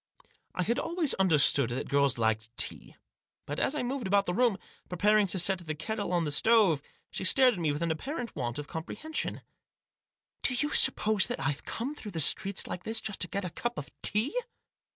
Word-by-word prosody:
I 180 Hz, -, 0 dB
had 235 Hz, +7 st, 0 dB
always 330 Hz, -1 st, 0 dB
understood 150 Hz, -8 st, +4 dB
that 125 Hz, +3 st, -4 dB
girls 140 Hz, -3 st, +2 dB
liked 110 Hz, -1 st, 0 dB
tea. -, -, -2 dB, 0.5 s
But, 145 Hz, -, -5 dB
as 285 Hz, -, 0 dB
I 295 Hz, -, -2 dB
moved 255 Hz, -2 st, -3 dB
about 200 Hz, +1 st, +2 dB
the 175 Hz, -, -2 dB
room, 235 Hz, -1 st, +2 dB, 0.3 s
preparing 205 Hz, +3 st, +3 dB
to 190 Hz, -, -3 dB
set 190 Hz, +1 st, +2 dB
the 155 Hz, -3 st, -5 dB
kettle 205 Hz, +5 st, -4 dB
on 175 Hz, -2 st, +1 dB
the 150 Hz, -, -2 dB
stove, 200 Hz, -3 st, +4 dB, 0.3 s
she -, -, -4 dB
stared 255 Hz, +6 st, +5 dB
at 190 Hz, -, -6 dB
me 160 Hz, -3 st, 0 dB
with 145 Hz, +3 st, -3 dB
an 165 Hz, -, 0 dB
apparent 245 Hz, -, -5 dB
want 120 Hz, -3 st, -3 dB
of 145 Hz, 0 st, -6 dB
comprehension. 305 Hz, -, -4 dB, 0.5 s
" -, -, -61 dB
Do 255 Hz, -, +1 dB
you 295 Hz, +4 st, 0 dB
suppose 210 Hz, -3 st, +4 dB
that -, -, -4 dB
I've 140 Hz, +2 st, -2 dB
come 250 Hz, +6 st, -4 dB
through 210 Hz, -9 st, -9 dB
the 165 Hz, -, -2 dB
streets 195 Hz, +6 st, +3 dB
like 180 Hz, -, -6 dB
this 225 Hz, +1 st, -1 dB
just 215 Hz, -, -5 dB
to 180 Hz, -, +2 dB
get 200 Hz, +1 st, -4 dB
a 180 Hz, -, -5 dB
cup 240 Hz, +6 st, -4 dB
of 145 Hz, -, -7 dB
tea 215 Hz, -, +2 dB
190 Hz, 210 wpm, -29 LUFS, 155-230 Hz, 0.5 s, stared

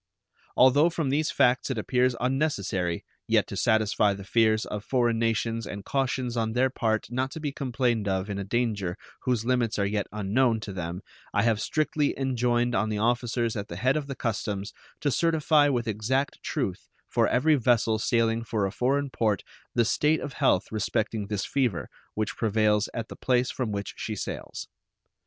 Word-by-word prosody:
Although 145 Hz, +6 st, +6 dB
from 160 Hz, -4 st, -2 dB
these 150 Hz, +2 st, +1 dB
facts 130 Hz, -1 st, +2 dB
it 130 Hz, -, -2 dB
appears 125 Hz, +2 st, +1 dB
unnecessary, 105 Hz, -, -1 dB, 0.2 s
yet -, -, +3 dB
to -, -, -7 dB
satisfy 105 Hz, -2 st, +2 dB
the 100 Hz, -, -8 dB
fears 110 Hz, +1 st, +2 dB
of 105 Hz, -1 st, -5 dB
foreign 120 Hz, -3 st, +1 dB
nations 115 Hz, 0 st, 0 dB
and 100 Hz, -1 st, -7 dB
cautions 130 Hz, -2 st, -1 dB
on 110 Hz, -1 st, -1 dB
their 130 Hz, +2 st, +2 dB
part 110 Hz, -3 st, -1 dB
not 130 Hz, +2 st, -1 dB
to 160 Hz, -, -6 dB
be 150 Hz, -2 st, -2 dB
complained 125 Hz, -5 st, -1 dB
of 95 Hz, 0 st, 0 dB
in 100 Hz, -1 st, -4 dB
a -, -, -2 dB
danger 100 Hz, -4 st, -1 dB, 0.3 s
whose 125 Hz, -4 st, 0 dB
limits 120 Hz, -3 st, +1 dB
are 100 Hz, -, +1 dB
yet 100 Hz, 0 st, -1 dB
unknown 110 Hz, +4 st, +1 dB
to 100 Hz, -2 st, -6 dB
them 90 Hz, 0 st, -5 dB, 0.3 s
I 105 Hz, -, +3 dB
have 115 Hz, -2 st, +2 dB
strictly 150 Hz, +2 st, 0 dB
enjoined 125 Hz, -2 st, +1 dB
on 110 Hz, -2 st, +1 dB
the 105 Hz, -, -1 dB
officers 120 Hz, +1 st, 0 dB
at 100 Hz, -2 st, -4 dB
the 85 Hz, -, -7 dB
head 130 Hz, +9 st, +1 dB
of 150 Hz, -2 st, -2 dB
the 135 Hz, -, -5 dB
customs 105 Hz, -4 st, -3 dB, 0.3 s
to 145 Hz, -, +1 dB
certify 155 Hz, -1 st, +3 dB
with 120 Hz, -4 st, -1 dB
exact 120 Hz, +6 st, -1 dB
truth -, -, -3 dB, 0.2 s
for -, -, +2 dB
every 155 Hz, +5 st, +3 dB
vessel 115 Hz, -4 st, +2 dB
sailing 115 Hz, 0 st, +1 dB
for 110 Hz, -3 st, -1 dB
a 95 Hz, -, -2 dB
foreign 135 Hz, +5 st, 0 dB
port 110 Hz, -5 st, 0 dB, 0.3 s
the 120 Hz, -1 st, +4 dB
state 150 Hz, +7 st, +2 dB
of 140 Hz, -, -6 dB
health 90 Hz, -, +2 dB
respecting 110 Hz, 0 st, -1 dB
this 100 Hz, -1 st, -2 dB
fever 120 Hz, -, -1 dB, 0.3 s
which 110 Hz, -1 st, -2 dB
prevails 105 Hz, -1 st, +2 dB
at 115 Hz, -2 st, -5 dB
the -, -, -8 dB
place 125 Hz, -1 st, +1 dB
from 120 Hz, -5 st, -3 dB
which 100 Hz, -1 st, -4 dB
she 110 Hz, -, -4 dB
sails. -, -, -6 dB
115 Hz, 185 wpm, -27 LUFS, 105-130 Hz, 0.3 s, Although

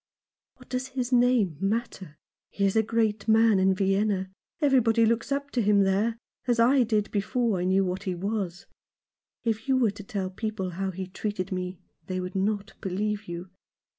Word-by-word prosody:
" -, -, -68 dB
What -, -, -18 dB
does 255 Hz, 0 st, -2 dB
his 255 Hz, -1 st, -3 dB
name 240 Hz, -, +3 dB
matter? 195 Hz, -6 st, -3 dB, 0.3 s
He 200 Hz, -, -1 dB
is 195 Hz, -, +1 dB
a 220 Hz, -, +5 dB
great 220 Hz, -2 st, 0 dB
man 220 Hz, -2 st, +5 dB
in 190 Hz, 0 st, +3 dB
Vienna. 195 Hz, 0 st, +1 dB, 0.3 s
Everybody 240 Hz, -6 st, +4 dB
looks 230 Hz, +4 st, 0 dB
up 280 Hz, +1 st, -2 dB
to 245 Hz, -, +1 dB
him 205 Hz, -1 st, +4 dB
there, 205 Hz, +4 st, +1 dB, 0.3 s
as 240 Hz, -1 st, +2 dB
I 255 Hz, +4 st, +5 dB
did 215 Hz, -3 st, +1 dB
before 215 Hz, 0 st, 0 dB
I 180 Hz, -, -1 dB
knew 190 Hz, +1 st, +3 dB
what 185 Hz, +1 st, -2 dB
he 185 Hz, -2 st, -1 dB
was. 195 Hz, -1 st, -3 dB, 0.8 s
If 225 Hz, +1 st, -1 dB
you 265 Hz, -1 st, +3 dB
were 235 Hz, -5 st, +3 dB
to 205 Hz, +1 st, -10 dB
tell 190 Hz, -2 st, -3 dB
people 195 Hz, -2 st, -3 dB
how 190 Hz, +2 st, -2 dB
he 190 Hz, 0 st, -5 dB
treated 190 Hz, 0 st, -4 dB
me 180 Hz, 0 st, -3 dB, 0.3 s
they 185 Hz, 0 st, -2 dB
would 180 Hz, 0 st, -5 dB
not 200 Hz, +2 st, -1 dB
believe 210 Hz, +2 st, -2 dB
you. 175 Hz, +1 st, -7 dB
205 Hz, 185 wpm, -27 LUFS, 190-230 Hz, 0.8 s, a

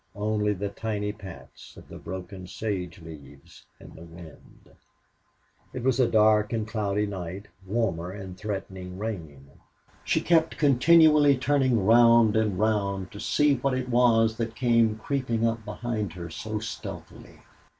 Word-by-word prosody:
Only 105 Hz, 0 st, 0 dB
the 100 Hz, +1 st, -4 dB
tiny 105 Hz, -1 st, -3 dB
pats 100 Hz, -4 st, -13 dB
of -, -, -14 dB
the -, -, -11 dB
broken 95 Hz, +1 st, -8 dB
sage 95 Hz, -3 st, -4 dB
leaves 70 Hz, -4 st, -14 dB
in -, -, -14 dB
the 80 Hz, -, -13 dB
wind! 85 Hz, -2 st, -15 dB, 1.0 s
It 125 Hz, -, -5 dB
was 130 Hz, 0 st, +1 dB
a 125 Hz, -, +4 dB
dark 105 Hz, -1 st, +3 dB
and 110 Hz, -2 st, -2 dB
cloudy 105 Hz, -2 st, -1 dB
night, 95 Hz, 0 st, -7 dB, 0.2 s
warmer 95 Hz, -5 st, -1 dB
and 95 Hz, -1 st, -8 dB
threatening 95 Hz, -2 st, -6 dB
rain. 80 Hz, -10 st, -6 dB, 0.6 s
She -, -, +1 dB
kept 165 Hz, -1 st, +2 dB
continually 150 Hz, 0 st, +5 dB
turning 130 Hz, -6 st, +1 dB
round 115 Hz, -1 st, +5 dB
and 110 Hz, -4 st, +1 dB
round 100 Hz, -2 st, -1 dB
to 105 Hz, -, -10 dB
see 145 Hz, +3 st, +2 dB
what 130 Hz, +1 st, -1 dB
it 130 Hz, -1 st, -3 dB
was 115 Hz, -2 st, +3 dB
that 115 Hz, -1 st, -4 dB
came 115 Hz, -3 st, +2 dB
creeping 115 Hz, -2 st, -2 dB
up 115 Hz, -1 st, -1 dB
behind 105 Hz, -3 st, -4 dB
her 85 Hz, -2 st, -8 dB
so 110 Hz, +5 st, -5 dB
stealthily. 110 Hz, 0 st, -8 dB
110 Hz, 145 wpm, -26 LUFS, 95-120 Hz, 1.0 s, continually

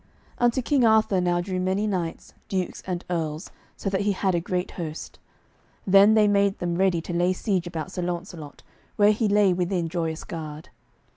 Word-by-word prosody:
Unto 240 Hz, +1 st, +2 dB
King 275 Hz, 0 st, +2 dB
Arthur 220 Hz, -4 st, +4 dB
now 175 Hz, 0 st, +1 dB
drew 185 Hz, 0 st, -3 dB
many 190 Hz, +3 st, 0 dB
knights, 180 Hz, -5 st, -3 dB, 0.2 s
dukes, 185 Hz, -2 st, -3 dB
and 180 Hz, -1 st, -3 dB
earls, 160 Hz, -2 st, -3 dB, 0.3 s
so -, -, -6 dB
that 195 Hz, 0 st, 0 dB
he 205 Hz, 0 st, +1 dB
had 190 Hz, 0 st, 0 dB
a 170 Hz, -, +2 dB
great 180 Hz, +1 st, -3 dB
host. 160 Hz, -3 st, -7 dB, 0.7 s
Then 200 Hz, +3 st, +6 dB
they 215 Hz, -1 st, +5 dB
made 200 Hz, -1 st, +2 dB
them 175 Hz, -1 st, -2 dB
ready 180 Hz, -1 st, +1 dB
to 175 Hz, -, -6 dB
lay 175 Hz, +2 st, +2 dB
siege 185 Hz, -2 st, -1 dB
about 170 Hz, +1 st, -5 dB
Sir 185 Hz, -, -4 dB
Launcelot, 175 Hz, -4 st, -6 dB, 0.3 s
where 205 Hz, 0 st, +5 dB
he 215 Hz, +1 st, 0 dB
lay 205 Hz, -2 st, +4 dB
within 175 Hz, -1 st, -1 dB
Joyous 165 Hz, -2 st, -3 dB
Gard. 155 Hz, -5 st, -7 dB
185 Hz, 185 wpm, -25 LUFS, 170-200 Hz, 0.7 s, Then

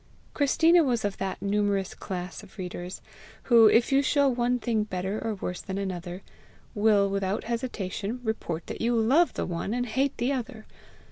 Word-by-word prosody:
Christina 325 Hz, +4 st, +4 dB
was 240 Hz, -6 st, 0 dB
of 205 Hz, -, -2 dB
that 195 Hz, 0 st, -4 dB
numerous 200 Hz, -1 st, 0 dB
class 180 Hz, -2 st, -6 dB
of 205 Hz, 0 st, -17 dB
readers, 180 Hz, -1 st, -6 dB, 0.4 s
who, 230 Hz, -3 st, +7 dB
if 235 Hz, +4 st, +4 dB
you 275 Hz, +1 st, +5 dB
show 285 Hz, 0 st, +3 dB
one 245 Hz, -1 st, +1 dB
thing 230 Hz, -3 st, 0 dB
better 190 Hz, +1 st, -3 dB
or 225 Hz, -1 st, -2 dB
worse 180 Hz, -2 st, -5 dB
than 190 Hz, 0 st, -5 dB
another, 180 Hz, -1 st, -5 dB, 0.5 s
will 205 Hz, -2 st, +3 dB
without 195 Hz, 0 st, -1 dB
hesitation 230 Hz, -2 st, -3 dB
report 175 Hz, -7 st, -3 dB
that -, -, -7 dB
you 235 Hz, +1 st, +2 dB
love 260 Hz, +10 st, +3 dB
the -, -, -2 dB
one 180 Hz, +5 st, -3 dB
and 245 Hz, 0 st, -1 dB
hate 265 Hz, +5 st, 0 dB
the 245 Hz, +4 st, 0 dB
other. 245 Hz, -4 st, -5 dB
215 Hz, 175 wpm, -27 LUFS, 195-245 Hz, 0.5 s, who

